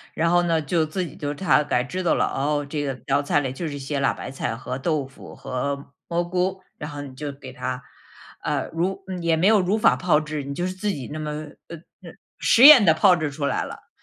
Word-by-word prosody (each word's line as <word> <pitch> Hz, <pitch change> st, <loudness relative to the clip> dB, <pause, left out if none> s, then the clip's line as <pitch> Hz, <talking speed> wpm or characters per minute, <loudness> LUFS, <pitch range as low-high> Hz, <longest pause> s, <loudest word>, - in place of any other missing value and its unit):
然 165 Hz, +1 st, +1 dB
后 175 Hz, +1 st, +4 dB
呢， 165 Hz, -2 st, +1 dB
就 160 Hz, +2 st, 0 dB
自 180 Hz, +4 st, -3 dB
己 -, -, -10 dB
就 145 Hz, 0 st, -4 dB
大 165 Hz, -2 st, +3 dB
概 125 Hz, -4 st, 0 dB
知 180 Hz, +8 st, -4 dB
道 175 Hz, -, +2 dB
了， -, -, +2 dB
哦， 145 Hz, +1 st, -1 dB
这 145 Hz, +1 st, -3 dB
个 135 Hz, -2 st, -2 dB
道 140 Hz, +1 st, +2 dB
菜 145 Hz, 0 st, +1 dB
里 130 Hz, -2 st, -3 dB
就 165 Hz, +5 st, -4 dB
是 145 Hz, -2 st, -5 dB
些 140 Hz, +1 st, -3 dB
辣 135 Hz, -, +2 dB
白 -, -, -7 dB
菜 135 Hz, -4 st, -3 dB
和 125 Hz, +2 st, -5 dB
豆 150 Hz, -1 st, -1 dB
腐 135 Hz, +1 st, -13 dB
和 140 Hz, +2 st, -4 dB, 0.2 s
蘑 170 Hz, 0 st, 0 dB
菇， 185 Hz, +2 st, -1 dB, 0.2 s
然 150 Hz, -, -5 dB
后 145 Hz, -1 st, -7 dB
你 135 Hz, -2 st, -10 dB
就 145 Hz, +2 st, -5 dB
给 135 Hz, -2 st, -11 dB
它， 130 Hz, -1 st, -4 dB, 0.6 s
呃， -, -, -2 dB
如 190 Hz, +4 st, -2 dB, 0.2 s
也 170 Hz, -1 st, +2 dB
没 160 Hz, +3 st, +1 dB
有 210 Hz, -1 st, +5 dB
如 190 Hz, +4 st, +1 dB
法 215 Hz, -, +4 dB
炮 175 Hz, -4 st, +2 dB
制， 155 Hz, -1 st, -5 dB
你 140 Hz, +1 st, -5 dB
就 175 Hz, -, -2 dB
是 185 Hz, -, -3 dB
自 190 Hz, +3 st, -5 dB
己 140 Hz, -8 st, -6 dB
那 155 Hz, -, -5 dB
么 155 Hz, -1 st, -4 dB, 0.4 s
呃， 170 Hz, -, -8 dB, 0.3 s
呃， -, -, -10 dB, 0.3 s
实 235 Hz, -, +4 dB
验 285 Hz, -5 st, +11 dB
地 170 Hz, -, +6 dB
炮 185 Hz, +2 st, +5 dB
制 155 Hz, -3 st, -2 dB
出 145 Hz, +1 st, -4 dB
来 -, -, 0 dB
了。 -, -, -10 dB
150 Hz, 265 characters per minute, -23 LUFS, 140-175 Hz, 0.6 s, 验